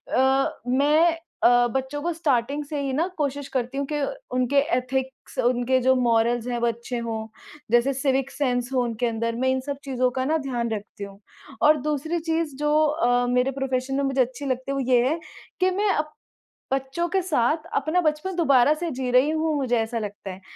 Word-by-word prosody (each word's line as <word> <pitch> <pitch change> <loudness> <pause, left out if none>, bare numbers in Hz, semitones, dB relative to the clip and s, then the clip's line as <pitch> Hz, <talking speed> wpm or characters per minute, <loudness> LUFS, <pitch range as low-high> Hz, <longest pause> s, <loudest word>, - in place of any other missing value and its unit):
अ, 265 +1 +2
मैं 305 +6 +3 0.3
अ, 245 0 +5
बच्चों 265 +4 -3
को 345 - -1
स्टार्टिंग 285 -2 0
से 290 0 -4
ही 275 -1 -2
ना, 320 +6 +1
कोशिश 285 -1 -2
करती 250 +2 -1
हूँ 280 - -1
कि - - 0 0.4
उनके 255 +2 +1 0.2
एथिक्स, 265 +1 -4
उनके 245 +1 +2
जो 260 +1 +4
मोरल्स 235 -1 +2
हैं, 245 -1 -1
वो 235 - +1
अच्छे 235 +2 -3
हों। 220 -1 -4 0.4
जैसे 240 +3 +3
सिविक 270 0 0
सेन्स 245 -3 -1
हो 255 - +2
उनके 235 0 -1
अंदर, 230 0 -2
मैं 260 +2 0
इन 260 0 +1
सब 280 -1 -3
चीज़ों 255 -2 +1
का 260 +1 -2
ना 315 +3 +2
ध्यान 240 -3 -1
रखती 210 -1 -6
हूँ। 200 0 -13 0.4
और 300 0 +6
दूसरी 310 +3 -1
चीज़, 320 -3 -2
जो 295 +1 0
अ, 245 -5 +2
मेरे 250 +2 +2
प्रोफ़ेशन 265 0 -1
में 280 - 0
मुझे 270 -1 +1
अच्छी 255 +3 -2
लगती 260 0 -2
है, 275 - -1
वो - - -1
ये 245 0 +4
है 325 +3 -1 0.4
कि 370 0 +3
मैं 405 +2 0
अप 305 0 -2 0.6
बच्चों 270 +6 -1
के 380 +2 +1
साथ 310 -2 0
अपना 320 +3 +1
बचपन 310 +4 -1
दोबारा 280 -5 +4
से 340 +1 -3
जी 255 -1 -3
रही 255 +4 +4
हूँ, 315 0 0
मुझे 250 -4 +1
ऐसा 225 +1 -2
लगता 205 -2 -6
है। 185 +1 -10
265 Hz, 200 wpm, -24 LUFS, 245-295 Hz, 0.6 s, और